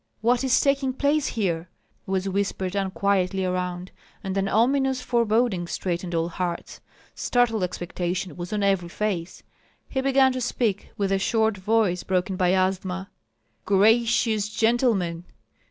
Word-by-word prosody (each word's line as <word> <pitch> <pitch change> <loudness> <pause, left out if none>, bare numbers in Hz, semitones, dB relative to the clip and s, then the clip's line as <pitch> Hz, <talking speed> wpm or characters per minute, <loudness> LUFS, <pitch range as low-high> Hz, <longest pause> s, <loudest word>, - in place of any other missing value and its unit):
what 240 +3 +2
is 260 -2 +3
taking 275 -1 +1
place 285 +2 +1
here?" 175 -6 -2 0.4
was 190 0 -1
whispered 190 -1 -2
unquietly 195 -1 0
around; 180 0 -3 0.3
and 190 -1 -3
an 195 0 0
ominous 265 +5 +2
foreboding 230 -6 +1
straitened 175 -1 -3
all 165 0 +1
hearts, 175 0 -4 0.3
startled 240 -4 +1
expectation 180 0 -3
was 175 0 -6
on 210 -1 -1
every 195 -3 +1
face. 185 -3 -3 0.4
He 265 - -2
began 265 0 +4
to 255 0 -3
speak, 225 -4 -1
with 200 -1 0
a 195 - +2
short 220 +1 +1
voice 195 -2 +1
broken 185 +1 -1
by 185 0 +2
asthma: 190 0 -1 0.6
"Gracious 220 +1 +3
gentlemen! 220 -7 +1
195 Hz, 135 wpm, -25 LUFS, 180-230 Hz, 0.6 s, began